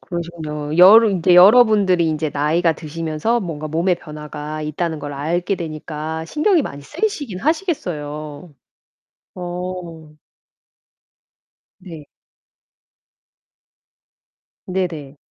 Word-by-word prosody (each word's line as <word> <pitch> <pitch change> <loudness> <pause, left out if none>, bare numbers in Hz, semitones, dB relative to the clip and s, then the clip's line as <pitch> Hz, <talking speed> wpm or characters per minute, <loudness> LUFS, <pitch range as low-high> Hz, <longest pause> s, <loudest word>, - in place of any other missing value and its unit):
그러시군요. 160 -4 -5
여러 210 +6 +8
인제 180 -3 +2
여러분들이 195 -3 +6
인제 155 -1 -2
나이가 160 +4 +1
드시면서 165 +8 -2
뭔가 155 -5 -5
몸에 170 +4 +1
변화가 150 -1 -8
있다는 160 +1 -3
걸 145 0 -6
알게 170 +7 -1
되니까 160 -1 -5
신경이 305 - +1
많이 140 - -7
쓰이시긴 285 - -3
하시겠어요. 160 - -3 0.8
어. 175 -3 -7 1.6
네. 165 -5 -11 2.6
네네. 165 -7 -4
165 Hz, 225 characters per minute, -19 LUFS, 150-185 Hz, 2.6 s, 여러